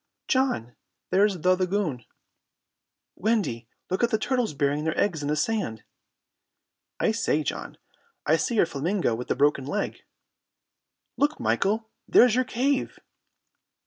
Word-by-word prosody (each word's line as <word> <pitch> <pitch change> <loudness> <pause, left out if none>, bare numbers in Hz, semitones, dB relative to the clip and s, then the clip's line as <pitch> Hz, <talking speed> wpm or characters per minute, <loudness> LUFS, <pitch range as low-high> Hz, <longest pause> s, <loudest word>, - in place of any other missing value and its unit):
"John, 255 - 0 0.4
there's 195 +1 +3
the 185 +2 +3
lagoon." 180 - -1 1.1
"Wendy, 195 - -1 0.2
look 185 - 0
at 235 - +4
the 220 - +2
turtles 240 - -1
burying 145 +1 0
their 160 0 -1
eggs 175 -7 +1
in 145 - -3
the 150 - +1
sand." 155 - -1 1.2
"I - - +2
say, 220 -9 0
John, - - -5 0.5
I - - +4
see 240 - -1
your 205 - +5
flamingo 165 - -1
with 120 +2 -5
the - - 0
broken 140 0 +2
leg!" 205 +7 -2 1.2
"Look, 295 +2 +1
Michael, 220 +3 0 0.2
there's 245 -2 +6
your 255 +2 +2
cave!" 260 +4 0
190 Hz, 135 wpm, -26 LUFS, 145-225 Hz, 1.2 s, there's